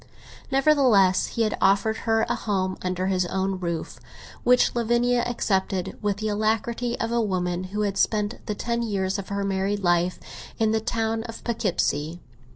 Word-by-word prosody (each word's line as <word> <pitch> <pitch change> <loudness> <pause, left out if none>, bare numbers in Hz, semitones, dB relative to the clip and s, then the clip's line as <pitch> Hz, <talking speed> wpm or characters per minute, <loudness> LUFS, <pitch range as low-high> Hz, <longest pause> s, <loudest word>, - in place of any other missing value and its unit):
Nevertheless 265 -10 +4
he 230 - -1
had 215 - 0
offered 200 +3 +3
her 225 0 +3
a - - 0
home 190 -3 -1
under 185 0 -2
his 185 -2 +1
own 190 +1 -1
roof, 170 -3 -4 0.4
which 250 0 +4
Lavinia 240 +1 +2
accepted 190 -5 -1
with 205 -2 0
the 215 +1 -3
alacrity 225 +3 -1
of 230 - -1
a 235 0 +2
woman 180 -3 -1
who 205 +3 -3
had 200 -2 -1
spent 210 +1 0
the 210 - -2
ten 235 +2 -2
years 195 -3 -1
of 195 - -7
her 200 0 -2
married 195 +1 -1
life 175 0 +2 0.4
in 220 -1 +2
the 220 0 +1
town 225 0 -1
of 230 -1 -8
Poughkeepsie. 175 - -1
205 Hz, 165 wpm, -25 LUFS, 190-230 Hz, 0.4 s, Nevertheless